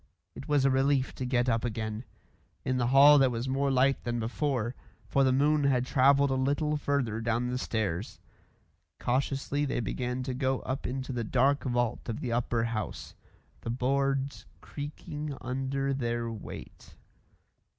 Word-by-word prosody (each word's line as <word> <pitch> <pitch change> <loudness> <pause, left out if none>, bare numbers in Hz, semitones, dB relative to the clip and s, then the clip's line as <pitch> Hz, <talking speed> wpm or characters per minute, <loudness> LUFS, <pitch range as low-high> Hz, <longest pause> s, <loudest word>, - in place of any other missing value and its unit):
It 135 - -9
was 145 -3 +3
a 135 - +4
relief 135 0 +2
to 130 - -4
get 125 -1 +1
up 115 -2 +1
again. 110 0 -3 0.6
In 130 0 0
the 120 -1 +1
hall 140 +3 +8
there 135 -1 +5
was 120 +1 -3
more 135 +1 +1
light 135 +1 +2
than 120 0 -2
before, 120 0 -1 0.3
for 135 +6 +2
the 130 - +4
moon 145 +2 +3
had 130 -2 +2
travelled 140 +1 +4
a - - +2
little 145 +3 +1
further 135 -7 -1
down 115 +2 0
the 125 - -1
stairs. 105 -6 -2 0.8
Cautiously 135 +3 0
they 135 -3 -1
began 125 +3 -2
to 130 0 -3
go 130 0 0
up 130 +2 -3
into 130 +1 -4
the 120 -1 -2
dark 135 +6 +2
vault 120 -2 -1
of 115 - -3
the 125 - -3
upper 115 -1 0
house, 115 -2 -4 0.5
the - - -5
boards 135 -2 0
creaking 145 +2 -6
under 135 +2 -2
their 120 -3 -2
weight. 110 -3 -10
130 Hz, 160 wpm, -29 LUFS, 120-140 Hz, 0.8 s, hall